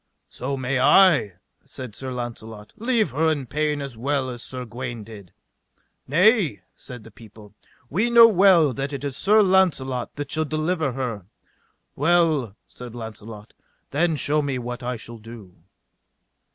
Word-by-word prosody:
So 135 +2 -4
may 130 0 -1
I, 150 - +5 0.3
said 130 -4 -9
Sir 130 +4 -6
Launcelot, 115 -3 -7
leave 230 -2 0
her 160 +4 +1
in 145 -4 -3
pain 150 +2 -1
as 135 -4 -7
well 130 +2 -2
as 120 -1 -8
Sir 125 0 -6
Gawaine 120 -1 -6
did. 100 -4 -13 0.8
Nay, 170 - +3
said 125 -4 -11
the 115 - -14
people, 105 -1 -16 0.3
we 205 - 0
know 235 -1 +8
well 185 - +4
that 135 +4 -4
it 140 - -5
is 140 -2 -4
Sir 210 +8 +4
Launcelot 160 -10 +1
that 145 -1 -6
shall 155 0 -1
deliver 155 -1 -1
her. 115 -8 -5 0.7
Well, 155 - +2
said 120 -1 -11
Launcelot, 110 -2 -9 0.4
then 160 +3 +1
shew 150 +1 +1
me 140 -3 -2
what 125 +1 -6
I 125 0 -3
shall 115 0 -10
do. 105 -5 -12
130 Hz, 150 wpm, -23 LUFS, 115-155 Hz, 0.8 s, know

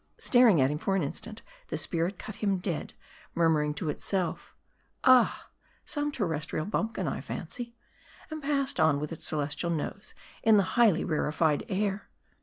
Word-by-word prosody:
Staring 245 - +5
at 130 +1 +3
him 150 - -3
for 195 - 0
an 190 - +1
instant, 215 +9 -6 0.2
the - - -3
spirit 175 +3 -1
cut 215 -1 -8
him 200 -3 +1
dead; 180 -3 -4 0.4
murmuring 160 -3 +3
to 160 - -3
itself, 180 +2 -3 0.5
".Ah, 255 -2 +4 0.3
some 295 0 0
terrestrial 160 - -2
bumpkin, 215 -2 -2
I - - -2
fancy," 235 - -6 0.6
and 310 0 -5
passed 275 -1 0
on 150 -3 +4
with 150 0 -4
its 165 - -5
celestial 150 +2 -1
nose 170 +5 -4 0.3
in 220 -1 +5
the 200 - +5
highly 220 -8 +4
rarified 155 -1 +1
air. 200 0 -1
185 Hz, 155 wpm, -29 LUFS, 155-225 Hz, 0.6 s, Staring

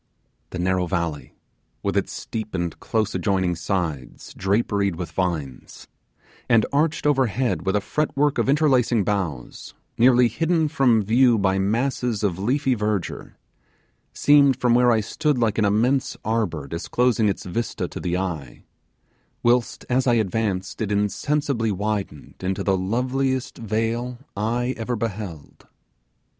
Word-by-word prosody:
The - - -6
narrow 90 0 0
valley, 85 -4 -3 0.5
with - - -1
its - - 0
steep 110 -3 -5
and 85 -2 -3
close 110 -2 -1
adjoining 95 -4 0
sides 80 -6 -4
draperied 100 -1 0
with 90 0 -6
vines, 80 -8 -4 0.6
and 115 -3 +5
arched 150 +2 +1
overhead 125 - +1
with 95 - +2
a 105 - +2
fret 150 +7 -2
work 145 0 +2
of - - +1
interlacing 130 -7 +3
boughs, 90 -10 -4 0.2
nearly 125 0 +6
hidden 160 +6 0
from 130 -8 +3
view 120 +3 +4
by 95 -1 +1
masses 115 +2 0
of 95 -3 0
leafy 130 +6 +1
verdure, 105 -5 -3 0.8
seemed 140 -2 +5
from 125 -1 +2
where 125 0 +5
I 110 -2 +3
stood 150 +7 -1
like 115 -3 +1
an 105 - +3
immense 120 +7 +1
arbour 105 -10 -1
disclosing 110 - +1
its 95 - -4
vista 115 +6 -3
to - - -7
the 90 0 -1
eye, 90 -7 -5 0.8
whilst 120 0 +1
as 130 +1 +1
I 120 - +4
advanced 105 -3 -1
it 105 -2 -1
insensibly 115 +3 0
widened 100 -6 -4
into 95 0 -2
the 95 - +2
loveliest 130 +7 -1
vale 115 +3 -2 0.2
eye 120 +5 -1
ever 115 +2 -2
beheld. 105 -8 -6
110 Hz, 140 wpm, -23 LUFS, 95-125 Hz, 0.8 s, nearly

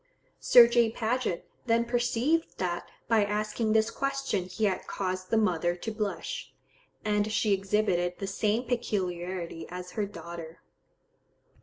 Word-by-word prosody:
Sir 240 -2 +8
J. 235 -1 +3
Paget 225 -6 -1 0.2
then 230 0 +3
perceived 245 +7 0
that 175 -2 -2 0.2
by 225 -2 +4
asking 215 +2 0
this 220 +1 +3
question 275 -9 -1
he 185 +4 -2
had 190 -3 -1
caused 185 -1 -3
the 225 - +2
mother 175 -5 +2
to 200 +5 -5
blush; 210 -2 -4 0.5
and 210 0 +1
she 215 -1 +2
exhibited 190 -3 +1
the 195 - -4
same 210 +4 0
peculiarity 185 -8 -3
as 180 0 -7
her 210 0 -2
daughter. 170 -4 -9
210 Hz, 135 wpm, -29 LUFS, 180-230 Hz, 0.5 s, Sir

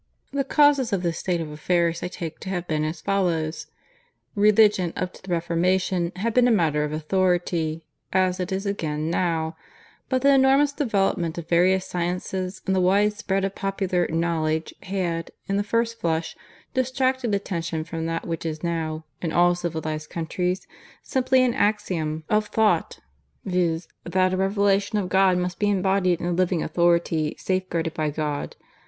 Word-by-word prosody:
"The 280 -1 +1
causes 280 -3 +3
of 190 -2 0
this 170 -2 -1
state 175 -2 -1
of 155 -2 -5
affairs 170 +2 0
I - - -2
take 170 -3 -6
to 190 - -7
have 175 -2 -3
been 155 -1 0
as 155 +1 -3
follows: 170 -4 -1 0.7
"Religion 210 -4 +4
up 180 0 -3
to - - -15
the 190 - -12
Reformation 175 +1 +1
had 220 +5 -1
been 250 0 +5
a - - +4
matter 160 -8 +2
of 150 - -3
authority, 165 -1 0 0.3
as 185 0 +2
it 180 +1 -3
is 190 +2 -2
again 160 -5 -2
now; 165 -2 0 0.5
but 260 0 0
the 280 0 +6
enormous 270 +2 +4
development 195 - 0
of 170 - -6
various 185 +2 +3
sciences 180 +2 -3
and 190 - +1
the 185 - +2
wide 200 +3 +3
spread 195 -2 -1
of 195 - -3
popular 195 -3 -1
'knowledge' 160 -1 -1
had, 175 -3 -2 0.2
in 195 - 0
the 205 - +1
first 230 +2 -1
flush, 160 -1 -1 0.4
distracted 260 -3 0
attention 170 -5 -3
from 165 0 -4
that 165 0 -3
which 165 -1 -3
is 155 -1 -4
now, 160 -2 -2 0.2
in 165 - -2
all 175 +1 +4
civilized 160 -3 -4
countries, 180 +2 -2 0.4
simply 260 -1 +2
an 250 -2 +2
axiom 170 -8 0
of 210 0 +1
thought, 210 -7 +1 0.4
viz., 175 -3 0 0.2
that 185 +1 +1
a - - 0
Revelation 200 +2 +1
of 190 -3 -1
God 190 -1 +4
must 180 -1 -2
be 205 - +2
embodied 190 -2 +2
in - - -4
a 175 - 0
living 175 -1 +1
authority 170 -3 +1
safeguarded 180 -3 -1
by 155 -1 -1
God. 150 -1 -3
180 Hz, 170 wpm, -24 LUFS, 165-200 Hz, 0.7 s, the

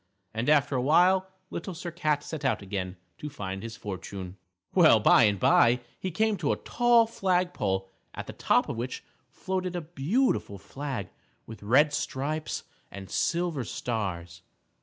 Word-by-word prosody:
And 115 +5 -1
after 145 -2 +3
a 125 - +1
while 185 +7 +4 0.2
Little 175 +1 -5
Sir 170 +1 -6
Cat 155 -3 0
set 155 -2 -6
out 130 -6 0
again 95 -1 -4 0.2
to 150 - -5
find 95 -8 -5
his 115 0 -7
fortune. 95 -2 -7 0.4
Well, 160 -11 +6
by 110 +2 +6
and 100 -2 +1
by, 120 +5 +4 0.2
he 190 - -3
came 215 +4 +1
to 155 -5 0
a - - +2
tall 240 -1 +3
flag 185 -5 0
pole 95 -2 -1 0.3
at - - -5
the - - -8
top - - +2
of 120 - -4
which 125 +2 -4 0.3
floated 185 -1 -3
a 175 - -2
beautiful 165 - 0
flag 130 -3 -5 0.4
with 110 - -10
red 140 +8 +4
stripes 150 +2 -3 0.3
and 100 -1 -10
silver 170 -5 0
stars. 90 -8 -4
140 Hz, 160 wpm, -28 LUFS, -, 0.4 s, Well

